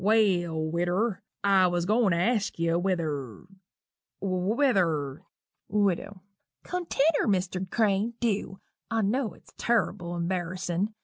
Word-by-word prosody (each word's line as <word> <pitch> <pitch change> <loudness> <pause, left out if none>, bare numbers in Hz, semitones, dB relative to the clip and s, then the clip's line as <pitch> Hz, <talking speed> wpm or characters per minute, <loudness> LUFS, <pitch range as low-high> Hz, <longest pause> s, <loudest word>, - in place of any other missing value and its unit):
"Well, 190 -6 +3
widder, 175 +7 0 0.2
I 195 -2 +5
was 175 -1 0
a - - -4
going 220 0 +3
to 170 - +2
ask 215 +3 +1
you 165 0 +1
whether 155 - -2 0.8
whether 185 - +1 0.2
" - - -55
WIDOW. 200 -1 0 0.4
"Continner, 330 -5 +1
Mr. 185 -1 0
Crane 215 +1 +1
dew 205 -4 -1 0.3
I 225 -1 +1
knew 225 +3 0
it's - - -21
turrible 180 -7 0
embarrissin'. 180 +3 -2
190 Hz, 120 wpm, -28 LUFS, 175-215 Hz, 0.8 s, I